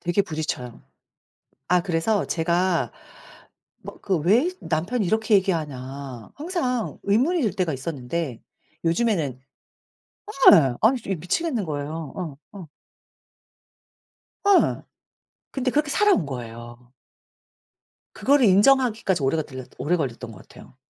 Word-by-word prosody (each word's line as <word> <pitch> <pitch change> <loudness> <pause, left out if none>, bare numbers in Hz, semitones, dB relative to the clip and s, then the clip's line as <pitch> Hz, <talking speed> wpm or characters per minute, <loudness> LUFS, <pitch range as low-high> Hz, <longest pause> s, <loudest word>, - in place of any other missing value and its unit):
되게 175 +3 +1
부딪혀요. 155 -8 -5 0.9
아 180 0 +4
그래서 180 +4 0
제가 170 +1 0 0.9
막 - - -10
그 190 -4 0
왜 210 - +3
남편이 175 +9 -1
이렇게 220 +3 +1
얘기하나 140 - -3
항상 285 - -2
의문이 265 - +2
들 220 - +1
때가 180 -4 -1
있었는데 135 -1 -4 0.4
요즘에는 165 - +1 1.2
예 135 -6 +5
아니 250 +4 +4
저 - - -10
이 - - +1
미치겠는 220 - -2
거예요. 150 0 -5
어 165 -7 -5 0.2
어. 170 -6 -10 1.8
예. 400 -2 +4 0.7
근데 260 -2 -1
그렇게 295 +2 +1
살아온 400 - +3
거예요. 120 -1 -9 1.3
그거를 280 -2 +4
인정하기까지 215 - +3
오래가 155 +4 +1
들렸 130 -3 -9
오래 175 +4 0
걸렸던 125 -5 -4
것 105 - -12
같아요. - - -16
175 Hz, 260 characters per minute, -24 LUFS, 140-220 Hz, 1.8 s, 예